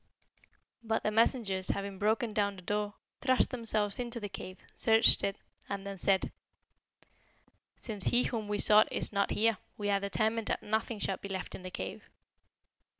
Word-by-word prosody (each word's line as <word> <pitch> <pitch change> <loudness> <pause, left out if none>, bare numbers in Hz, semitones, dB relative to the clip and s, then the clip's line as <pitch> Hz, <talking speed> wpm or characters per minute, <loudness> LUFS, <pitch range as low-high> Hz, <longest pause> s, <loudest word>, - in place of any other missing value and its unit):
But 225 -1 -1
the 215 - +1
messengers 215 -4 +2
having 200 -1 -2
broken 215 +2 +1
down 200 -2 0
the 185 - -12
door, 205 +2 -2 0.3
thrust 255 -2 +3
themselves 215 -4 0
into 240 -1 -4
the 205 -2 -5
cave, 185 -1 -8 0.2
searched 225 +1 +5
it, 195 - 0 0.3
and 200 -1 -4
then 200 -1 -6
said, 190 +1 +2 1.5
'Since 210 -5 -4
he 245 +1 +4
whom 220 -3 -3
we 210 0 -1
sought 210 +1 +5
is - - -1
not 200 0 +1
here, 220 -2 +2 0.2
we 205 -1 -1
are 200 - +2
determined 220 +2 0
that - - -1
nothing 220 +2 -1
shall 195 -2 -2
be 200 - -8
left 190 -1 -5
in - - -8
the 185 - -7
cave.' - - -7
210 Hz, 170 wpm, -31 LUFS, 200-225 Hz, 1.5 s, searched